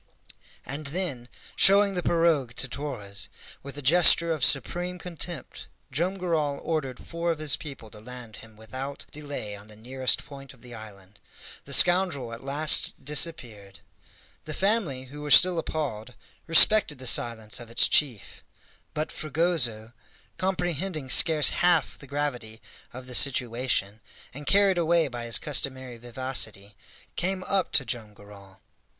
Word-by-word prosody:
And 145 +2 -6
then, 140 -7 -4 0.3
showing 200 +1 +5
the 180 - -2
pirogue 165 -9 +1
to 130 - -1
Torres, 115 -8 -6 0.3
with 140 0 -9
a 145 - -7
gesture 170 +3 +6
of 155 -5 -1
supreme 175 +8 +1
contempt 175 -3 -7 0.2
Joam 180 +6 -1
Garral 155 -6 -1
ordered 140 -6 -3
four 170 0 -4
of 165 - 0
his 155 -2 +2
people 135 -8 -10
to 105 - -11
land 120 -2 -10
him 110 -1 -15
without 130 +6 -7
delay 145 -8 -7
on 100 +1 -13
the 105 - -13
nearest 130 +4 -1
point 135 -2 -12
of 120 - -25
the 120 -1 -11
island. 100 -3 -12 0.5
The - - -5
scoundrel 175 -10 +3
at 115 - -10
last 145 0 +2
disappeared. 120 - 0 0.6
The 155 -1 -5
family, 195 - -1
who 145 +3 -11
were 150 - -6
still 180 +3 +6
appalled, 125 -8 -5 0.3
respected 165 -1 +6
the 130 - -9
silence 115 -2 +1
of 120 -1 -11
its 115 - +3
chief; 130 -9 -1 0.5
but 155 +1 -3
Fragoso, 140 -9 -1 0.5
comprehending 175 -5 -2
scarce 155 -2 +6
half 175 -2 +1
the 140 - -12
gravity 125 -6 -4 0.3
of 130 +1 -10
the 125 - -9
situation, 120 -5 0 0.3
and 145 +2 -10
carried 195 -2 +3
away 165 -2 +2
by 120 -1 -7
his 115 - +3
customary 130 -4 -2
vivacity, 120 -4 -2 0.4
came 185 +1 -1
up 190 -1 -1
to 135 - +2
Joam 110 -3 -6
Garral. 100 -1 -16
140 Hz, 145 wpm, -26 LUFS, 120-165 Hz, 0.6 s, gesture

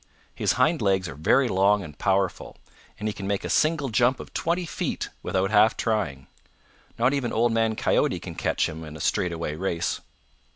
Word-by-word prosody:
His - - +1
hind 160 -4 +2
legs 95 -3 +1
are 70 - -6
very 80 - +3
long 100 0 +3
and 75 -4 -10
powerful, 95 +1 -1 0.4
and 105 - -4
he 105 - -1
can 100 -1 -6
make 100 -1 -1
a - - -2
single 155 -3 +2
jump 120 +3 +2
of - - -10
twenty 175 +2 -1
feet - - -3
without 95 +1 -1
half 110 +1 +5
trying. 90 - -1 0.7
Not 125 +4 +2
even 135 -4 -1
Old 115 +1 +2
Man 115 -1 +1
Coyote - - +1
can - - -8
catch - - 0
him 80 +1 -7
in 75 0 -9
a - - -12
straightaway 85 0 -1
race. 85 0 -2
100 Hz, 190 wpm, -25 LUFS, 90-120 Hz, 0.7 s, half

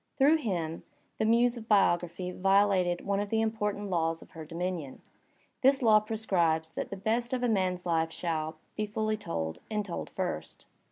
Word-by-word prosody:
Through 290 +3 +5
him, 170 - -3 0.4
the 220 - +2
Muse 235 +2 +3
of 225 -1 -9
Biography 180 -3 +2
violated 195 -2 +2
one 200 0 +1
of 205 0 -2
the 225 - +1
important 210 -2 -1
laws 165 -1 0
of - - -20
her 160 - -8
dominion. 165 -3 -4 0.6
This 270 0 +4
law 215 -2 +7
prescribes 180 -8 0
that - - -4
the 200 - -5
best 230 +5 -1
of 250 -1 -1
a - - +3
man's 185 -5 0
life 165 -1 +1
shall 160 -2 -2 0.2
be 215 0 -2
told 215 +1 -1
f 215 -3 -4
ully, 80 - -2
and 210 -2 -1
told 175 - -5
first. 180 - -4
195 Hz, 180 wpm, -30 LUFS, 170-220 Hz, 0.6 s, law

